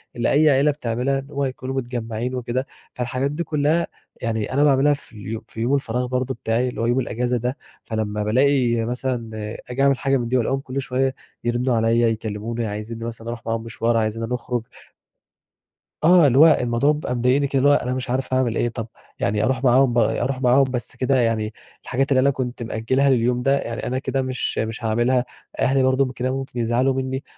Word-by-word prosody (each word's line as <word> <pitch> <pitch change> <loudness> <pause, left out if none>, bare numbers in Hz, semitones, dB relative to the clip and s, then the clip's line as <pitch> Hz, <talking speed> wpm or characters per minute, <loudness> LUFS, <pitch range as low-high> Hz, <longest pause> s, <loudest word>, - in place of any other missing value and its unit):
اللي 120 - 0
أي 155 +2 +5
عيلة 140 +2 +4
بتعملها 135 0 -1
اللي 135 +2 -11
هو 140 0 0
يكونوا 130 0 -4
متجمّعين 120 -1 -3
وكده، 125 +1 -2 0.3
فالحاجات 130 +3 -2
دي 160 +3 -2
كُلها 155 +2 +1 0.3
يعني 110 -1 -2
أنا 140 +2 +3
باعملها 145 0 +4
في 140 - -10
ال 110 +1 -6
في 115 - -7
يوم 125 +5 +2
الفراغ 125 -2 -1
برضه 130 +1 -1
بتاعي 115 +1 -1
اللي 125 - -5
هو - - +1
يوم 120 +2 +2
الأجازة 125 0 -1
ده، 125 +4 -2 0.3
فلما 105 -2 -2
بالاقي 120 0 +2
مثلًا 125 -1 -3 0.4
آجي 125 +2 -2
أعمل 140 -1 +4
حاجة 135 0 +1
من 120 -2 -2
دي 130 +2 +1
وألاقيهُم 130 +3 0
كل 135 0 -4
شوية 130 0 -1 0.3
يرنّوا 120 +1 +1
عليّ 115 +1 +2
يكلّموني، 115 0 -1
عايزينّي 105 +2 -5
مثلًا 115 -1 -7
أروح 115 0 -6
معاهم 115 0 -2
مشوار، 115 0 0
عايزينّا 110 +1 -1
نخرج 125 -1 -2 1.4
آه، 170 -1 +7
اللي 130 -1 +2
هو 160 - +9
الموضوع 125 -2 +3
بيبقى 150 -4 -2
مضايقني 125 +4 +2
كده، 135 0 0
اللي 140 +2 +4
هو - - +6
أنا 125 -3 +1
مش 130 0 -4
عارف 130 +1 -1
أعمل 130 -3 +1
إيه، 120 - +1
طب 115 -1 -5 0.3
يعني 105 +1 0
أروح 130 0 0
معاهم 130 0 +4
ب - - -1
أروح 125 +3 +1
معاهم 130 +2 +5
بس 125 -2 -3
كده 135 +1 +1
يعني 110 -2 0 0.3
الحاجات 135 +3 -1
اللي 130 - +5
أنا 135 +2 +4
كنت 125 -3 -3
مأجلها 115 +5 +1
لليوم 125 -1 +2
ده 135 +1 +3
يعني 115 -2 -4
أنا 130 +1 -1
كده 135 0 -1
مش 130 -1 -3
مش 110 +1 -3
هاعملها، 120 +3 +2 0.3
أهلي 135 0 +3
برضه 130 0 +2
كده 125 +1 -2
ممكن 135 -2 -4
يزعلوا 120 +3 +2
مني، 130 +1 -3
125 Hz, 200 wpm, -22 LUFS, 115-135 Hz, 1.4 s, هو